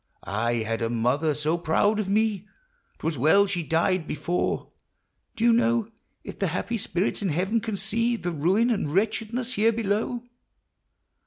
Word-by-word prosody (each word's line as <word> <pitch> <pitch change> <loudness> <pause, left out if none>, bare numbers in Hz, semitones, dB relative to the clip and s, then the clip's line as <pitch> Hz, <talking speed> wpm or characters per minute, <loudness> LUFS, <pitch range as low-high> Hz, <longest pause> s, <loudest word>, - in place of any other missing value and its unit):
I 110 +4 -1
had 115 +1 -2
a 115 - 0
mother 125 +7 +1
so 155 +3 0
proud 205 +6 +2
of 200 -3 -2
me! 210 -1 +1 0.5
'T - - -10
was 160 -5 -1
well 160 +9 +5
she 190 -3 -2
died 165 +2 +1
before 175 +3 -2 0.3
— - - -50
Do 225 - -3
you 235 0 +6
know 235 -1 +2 0.3
If - - -9
the 195 - +1
happy 215 +7 -2
spirits 185 +2 -1
in 195 - 0
heaven 190 +8 0
can 220 -2 -3
see 230 +4 0
The 180 -6 -3
ruin 185 +10 +2
and 200 -10 -1
wretchedness 225 +4 -1
here 220 +1 +3
below 225 +2 -1
195 Hz, 170 wpm, -26 LUFS, 160-225 Hz, 0.5 s, you